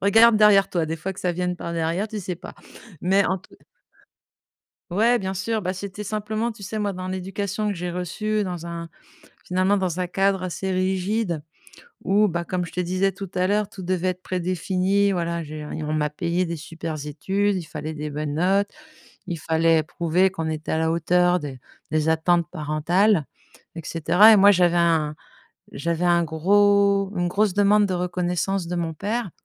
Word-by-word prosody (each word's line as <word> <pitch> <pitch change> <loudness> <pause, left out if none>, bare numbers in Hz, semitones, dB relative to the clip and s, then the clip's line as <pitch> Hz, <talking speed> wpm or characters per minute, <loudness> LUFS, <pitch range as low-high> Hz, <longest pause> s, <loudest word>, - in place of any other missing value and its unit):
regarde 225 +3 +6
derrière 200 -2 +5
toi, 170 -3 0
des 160 - -2
fois, 185 +5 -4
que 190 - -15
ça 180 - -1
vienne 180 +1 -2
par 170 - -5
derrière, 170 +4 -1
tu 215 -1 -6
sais 180 -1 -4
pas, - - -11 0.5
mais 195 +2 +3
en 190 +2 0
tout - - -20
c - - -26 1.3
Ouais, 230 +7 +3
bien 190 0 -3
sûr, 215 +4 -2
bah, 185 0 -1
c'était 195 +2 -7
simplement, 215 +2 -2
tu 215 -3 -10
sais, 215 +3 -4
moi, 205 -1 -1
dans 185 0 -6
l'éducation 195 +3 -3
que 205 - -1
j'ai 175 0 -4
reçue 210 +5 -2
dans 175 -3 -5
un 170 0 -6 0.6
finalement, 185 +2 +1
dans 185 -3 -1
un 180 - -1
cadre 195 +1 +1
assez 185 +1 -3
rigide 185 -1 -1 0.6
où, 205 +2 +3
bah, 170 -3 -2
comme 180 +1 -2
je - - -12
te 180 - -2
disais 185 +2 0
tout 195 0 -8
à 180 0 +2
l'heure, 205 +1 +1
tout 205 -3 -10
devait 185 0 0
être 185 0 -3
prédéfini, 185 +2 0
voilà, 170 -2 -2
je 155 0 -9
veux 150 -1 -6
dire, 155 -1 -4
on 155 - -1
m'a 150 -1 0
payé 170 +4 -1
des 170 -1 -4
super 160 -1 -6
études, 195 +7 0
il 185 - -2
fallait 155 -1 -6
des 150 0 -5
bonnes 145 0 -3
notes, 195 +5 +2 0.6
il 170 - -3
fallait 160 0 +2
prouver 175 +3 +1
qu'on 165 -4 -4
était 155 0 -4
à 160 - +1
la 160 0 +1
hauteur 175 +2 +2
des 140 -5 -7 0.3
des 155 0 +1
attentes 170 +1 +2
parentales, 165 +4 +1 0.5
et - - -4
cetera, 180 +8 +5
et - - +7
moi 200 0 +7
j'avais 175 -3 +3
un 165 -3 +2 0.6
j'avais 170 +3 -2
un 175 -1 +4
gros 200 +4 +3
une 175 0 0
grosse 200 +1 +1
demande 205 +1 +4
de 185 - -2
reconnaissance 180 +1 -1
de 175 - -3
mon 165 -2 -2
père, 210 +5 -3
180 Hz, 195 wpm, -23 LUFS, 165-200 Hz, 1.3 s, et